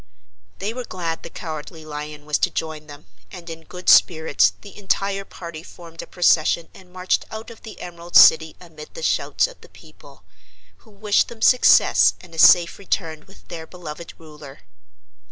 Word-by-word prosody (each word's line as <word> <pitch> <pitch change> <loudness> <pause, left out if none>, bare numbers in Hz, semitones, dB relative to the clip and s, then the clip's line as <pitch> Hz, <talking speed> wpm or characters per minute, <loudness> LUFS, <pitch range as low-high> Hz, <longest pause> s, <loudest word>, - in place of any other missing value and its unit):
They 205 +3 -4
were 250 +1 -6
glad 170 -6 -5
the - - -9
Cowardly 160 0 -8
Lion 150 0 -8
was 150 -1 -1
to - - +1
join 155 -1 -6
them, 145 -8 -13 0.3
and 175 -2 -11
in 165 0 -11
good 180 0 -11
spirits 160 -2 +4
the 200 - -14
entire 195 0 -2
party 170 -4 -10
formed 165 -1 -12
a - - -11
procession 170 -1 +1
and 185 -1 -17
marched 185 0 -1
out 220 +2 -9
of 225 - -15
the 220 - -11
Emerald 175 -1 -10
City 160 0 +6
amid 160 -4 -14
the - - -8
shouts - - +1
of - - -10
the - - -17
people, - - -18 0.5
who 225 - -23
wished 205 0 0
them 225 -1 -9
success 250 - +5
and 175 -2 -16
a 165 - -8
safe 175 +1 +5
return 160 -5 -4
with 195 - -20
their 160 -1 -8
beloved 170 -2 -10
Ruler. 150 - -14
170 Hz, 175 wpm, -21 LUFS, 155-195 Hz, 0.5 s, City